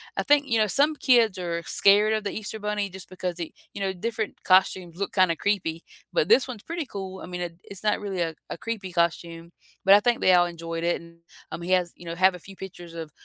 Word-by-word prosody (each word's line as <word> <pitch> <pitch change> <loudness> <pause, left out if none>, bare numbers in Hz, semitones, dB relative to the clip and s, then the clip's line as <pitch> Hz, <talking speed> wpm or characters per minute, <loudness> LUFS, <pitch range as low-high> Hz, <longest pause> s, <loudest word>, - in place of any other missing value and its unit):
I - - -1
think, 290 -1 +3
you 230 -3 +2
know, 215 -1 +3
some 290 +8 +3
kids 235 -8 +3
are 170 -2 -3
scared 210 +2 +4
of 215 -1 -1
the 200 - -2
Easter 220 0 -5
Bunny 210 -1 -2
just 190 0 -10
because 180 -1 -4
they 170 -2 -6 0.2
you 200 - -7
know, 190 -1 0
different 220 +3 -4
costumes 185 -2 +3
look 200 +2 -4
kinda 185 -3 +3
creepy, 165 -3 -1 0.3
but 160 - +1
this 250 +4 +5
one's 235 -5 -8
pretty 335 -1 -4
cool. 190 -5 -7
I - - -8
mean 180 0 -6
it 170 0 -6
it's 200 0 -10
not 210 - +2
really 195 -4 -3
a 165 -1 -1 0.2
a - - -5
creepy 205 -5 -5
costume, 170 -1 -1 0.3
but 195 +1 +7
I - - +7
think 240 +3 +1
they 185 - +5
all 175 -1 +6
enjoyed 165 -1 -5
it 175 - 0
and, 170 0 -16 0.3
um, 170 - -5
he 180 +2 -4
has 180 -2 +2
you 175 - -13
know, 165 - -5
have 185 +1 +4
a 180 - -9
few 195 +3 -12
pictures 175 -3 -10
of 160 -3 -7
190 Hz, 250 wpm, -26 LUFS, 170-210 Hz, 0.3 s, but